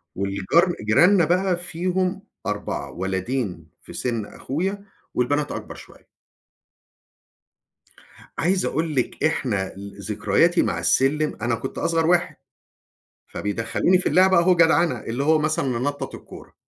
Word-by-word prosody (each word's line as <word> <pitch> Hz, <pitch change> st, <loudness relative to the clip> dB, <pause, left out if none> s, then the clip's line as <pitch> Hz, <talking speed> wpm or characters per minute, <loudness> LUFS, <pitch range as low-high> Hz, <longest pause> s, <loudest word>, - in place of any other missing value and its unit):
والجار 100 Hz, -, +1 dB
جيراننا 170 Hz, -, +4 dB
بقى 180 Hz, +2 st, +1 dB
فيهم 180 Hz, +2 st, -2 dB, 0.2 s
4، 105 Hz, -9 st, -3 dB
ولدين 95 Hz, -, -3 dB
في -, -, -12 dB
سِن 115 Hz, -4 st, -2 dB
أخويا، 190 Hz, -, -4 dB, 0.3 s
والبنات 145 Hz, +4 st, 0 dB
أكبر -, -, -6 dB
شوية. -, -, -15 dB, 2.3 s
عايز 185 Hz, +2 st, +1 dB
أقول 160 Hz, 0 st, -1 dB
لِك 130 Hz, +2 st, -1 dB
إحنا 110 Hz, -11 st, 0 dB
ل 100 Hz, 0 st, -10 dB
ذكرياتي 105 Hz, -, +2 dB
مع 90 Hz, -6 st, -1 dB
السلم 135 Hz, -, +1 dB
أنا 120 Hz, -1 st, +1 dB
كنت 130 Hz, +3 st, -6 dB
أصغر 165 Hz, -1 st, +1 dB
واحد، 175 Hz, 0 st, +2 dB, 0.9 s
فبيدخلوني 115 Hz, -, 0 dB
في 185 Hz, -, -1 dB
اللعبة 190 Hz, 0 st, +5 dB
أهو 180 Hz, +1 st, +4 dB
جدعنة 170 Hz, 0 st, +3 dB
اللي 120 Hz, +5 st, -3 dB
هو 155 Hz, +1 st, +4 dB
مثلًا 155 Hz, -2 st, 0 dB
ننطط 130 Hz, +4 st, -2 dB
الكورة، -, -, -13 dB
145 Hz, 120 wpm, -23 LUFS, 105-175 Hz, 2.3 s, اللعبة